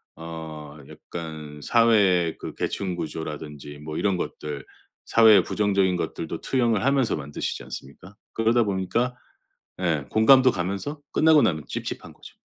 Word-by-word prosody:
어 80 -2 -8
약간 80 -3 -8
사회의 100 -8 +3
그 - - -7
계층 95 -3 -2
구조라든지 75 -2 -6
뭐 75 +1 -7
이런 100 -3 +1
것들 75 -5 -5 0.4
사회의 110 -5 +6
부정적인 100 -3 +1
것들도 80 0 -4
투영을 120 -5 +1
하면서 135 -4 +2
만드시지 75 -1 -4
않습니까? 85 +9 -10 0.2
그러다 115 +1 +3
보니까 105 +6 -1 0.7
예 80 -6 0
공감도 130 +4 +6
가면서 100 - -3
끝나고 155 -1 +5
나면 80 -4 +1
찝찝한 - - -6
거죠. - - -15
90 Hz, 315 characters per minute, -25 LUFS, 80-115 Hz, 0.7 s, 사회의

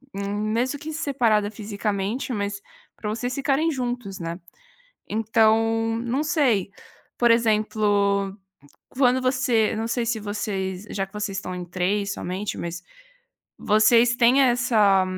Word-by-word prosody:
mesmo 215 +7 -1
que 310 +2 -6
separada 235 -9 +1
fisicamente, 205 +3 -3
mas 200 -1 -3 0.3
para 210 - -5
vocês 245 +4 -3
ficarem 280 +3 +1
juntos, 245 -7 -4
né. 170 0 -5 0.7
Então 225 +1 +2
não 250 +5 -1
sei, 265 - +1 0.5
por 240 - +3
exemplo, 210 -3 +1 0.5
quando 255 -1 +2
você, 255 -4 +1
não 225 +1 -2
sei 230 0 -1
se 225 -1 -1
vocês 205 -2 -4
já 195 - -2
que 195 - -29
vocês 210 -2 -3
estão 185 -2 -5
em 180 - -5
3 195 +3 -1
somente, 190 +3 -4
mas 170 0 -5 0.7
vocês 230 +3 +4
têm 245 +3 +5
essa 225 -6 +3
215 Hz, 125 wpm, -24 LUFS, 200-245 Hz, 0.7 s, têm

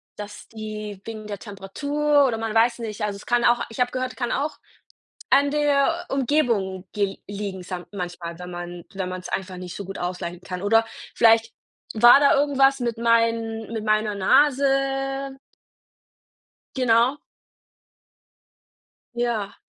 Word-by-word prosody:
dass 205 0 -9
die 215 -2 -7
wegen 215 -2 -7
der 205 -1 -5
Temperatur 285 +9 0
oder 225 -3 -2
man 225 -1 -3
weiß 235 +2 +3
nicht. 220 -2 -5
Also, 205 -1 -2
es 200 - -14
kann 240 0 +2
auch 240 0 +4
ich 225 - -10
habe 250 0 +2
gehört, 255 0 -3
es - - -21
kann 240 -2 -2
auch 295 +3 -2 0.7
an 285 0 +4
der 295 +3 +2
Umgebung 230 -9 0
ge 200 -2 -1
liegen 200 -2 -5
sam 180 -1 -6
manchmal, 175 -3 -6
wenn 180 0 -8
man 175 0 -7
wenn 190 -1 -3
man's 185 0 -6
einfach 190 -1 -4
nicht 180 -1 -7
so 200 - -5
gut 195 +1 -7
ausgleichen 175 -1 -4
kann, 180 0 -6
oder 225 +2 +3 0.3
vielleicht 225 0 +4 0.4
war 240 +5 +7
da 280 - +5
irgendwas 275 -1 +3
mit 235 -2 -2
meinen 230 -1 +1
mit 220 -1 -3
meiner 215 -1 +1
Nase. 270 +3 +2 1.4
Genau. 250 +2 +3 2.0
Ja. 235 -4 -2
225 Hz, 145 wpm, -24 LUFS, 195-265 Hz, 2.0 s, war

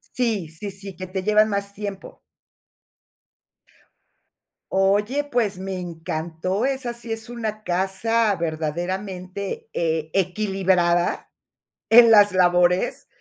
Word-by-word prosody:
Sí, 225 -8 0
sí, 165 +6 -6
sí. 195 0 -9
Que 185 - -7
te 185 +1 -4
llevan 215 +1 +4
más 200 -1 -2
tiempo. 200 -1 -7 2.5
Oye, 205 +8 +2
pues, 225 -9 -1
me 190 0 -4
encantó. 170 +3 -3
Esa 265 -3 -1
sí 235 -1 -7
es 225 0 -3
una 220 -3 -5
casa, 195 +4 +1
verdaderamente 180 - -4
eh, 160 -2 -1
equilibrada 185 -2 +1 0.6
en 230 0 +8
las 205 -2 +7
labores. 180 0 +2
195 Hz, 105 wpm, -23 LUFS, 180-215 Hz, 2.5 s, en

